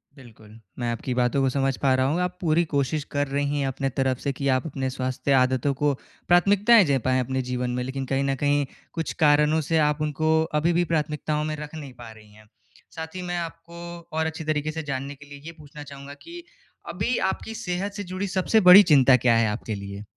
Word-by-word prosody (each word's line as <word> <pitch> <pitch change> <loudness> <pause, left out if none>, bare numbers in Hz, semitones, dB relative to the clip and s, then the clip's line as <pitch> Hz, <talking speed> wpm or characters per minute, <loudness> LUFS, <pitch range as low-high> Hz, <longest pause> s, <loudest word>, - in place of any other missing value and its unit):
बिल्कुल, 115 -4 -16 0.2
मैं 120 -1 -1
आपकी 125 +2 -4
बातों 125 +2 +1
को 135 - +2
समझ 135 0 0
पा 135 -2 +2
रहा 130 0 +1
हूँ 160 +5 0
आप 180 0 -3
पूरी 165 0 +2
कोशिश 140 +2 0
कर 145 0 0
रही 145 +1 -1
हैं 135 - 0
अपने 135 +1 -2
तरफ 130 -1 -1
से 140 - -2
कि 140 +2 -3
आप 130 - -2
अपने 135 -3 -3
स्वास्थ्य 130 +1 -3
आदतों 130 +1 +2
को 145 -1 +3 0.3
प्राथमिकताएँ 205 +5 +5
दे 140 -3 +2
पाएँ 130 0 +2
अपने 130 +1 -1
जीवन 125 0 -2
में 125 - -2
लेकिन 135 +1 -4
कहीं 135 +1 -1
न 135 0 0
कहीं, 145 +1 +1 0.3
कुछ 165 -1 -3
कारणों 150 +1 +4
से 165 - +2
आप 150 +1 -1
उनको 155 +2 +1 0.2
अभी 170 +2 +2
भी 175 +1 +2
प्राथमिकताओं 150 0 -1
में 155 0 -3
रख 150 +1 -8
नहीं 140 -4 -8
पा 120 -2 -11
रही 110 -1 -17
हैं, 110 0 -19 0.5
साथ 160 +2 -7
ही 185 - -4
मैं 175 0 -3
आपको 170 0 -7 0.4
और 160 - +1
अच्छी 160 0 -4
तरीके 155 0 -1
से 160 0 -5
जानने 140 0 -5
के 145 +1 -15
लिए 145 0 -10
ये 165 - -6
पूछना 150 0 -11
चाहूँगा 140 0 -10
कि 345 0 -10 0.5
अभी 245 - -1
आपकी 225 - -8
सेहत 195 -1 -3
से 205 - -5
जुड़ी 195 +2 -2
सबसे 190 +4 +2
बड़ी 200 +3 +11
चिंता 135 -2 +6
क्या 120 -1 +3
है 115 - +3
आपके 105 0 -4
लिए? 100 +1 -8
145 Hz, 225 wpm, -24 LUFS, 130-160 Hz, 0.5 s, बड़ी